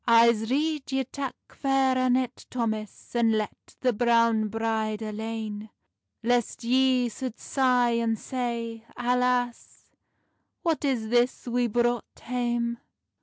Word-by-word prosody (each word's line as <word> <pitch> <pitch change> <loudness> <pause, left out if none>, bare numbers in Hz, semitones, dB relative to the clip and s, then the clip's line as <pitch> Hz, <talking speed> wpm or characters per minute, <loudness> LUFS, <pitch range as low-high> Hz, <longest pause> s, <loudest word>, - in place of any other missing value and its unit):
"I'se 230 -1 +5
rede 295 +1 0
ye 265 0 +2
tak 270 +1 -5 0.2
Fair 270 -1 +2
Annet, 255 -1 0
Thomas, 220 -4 -3
And 230 -2 +3
let 215 -1 -4
the 250 -2 +2
browne 230 -1 +3
bride 220 0 -1
alane; 215 0 -5 0.5
Lest 240 0 +1
ye 255 +1 +3
sould 245 0 -5
sigh, 250 -3 +2
and 225 -1 +1
say, 235 -2 -3
Alace, 250 0 0 0.7
What 325 -3 0
is 245 -6 0
this 245 +2 +2
we 245 0 +1
brought 240 +1 0
hame!" 240 -1 -1
240 Hz, 120 wpm, -27 LUFS, 225-255 Hz, 0.7 s, I'se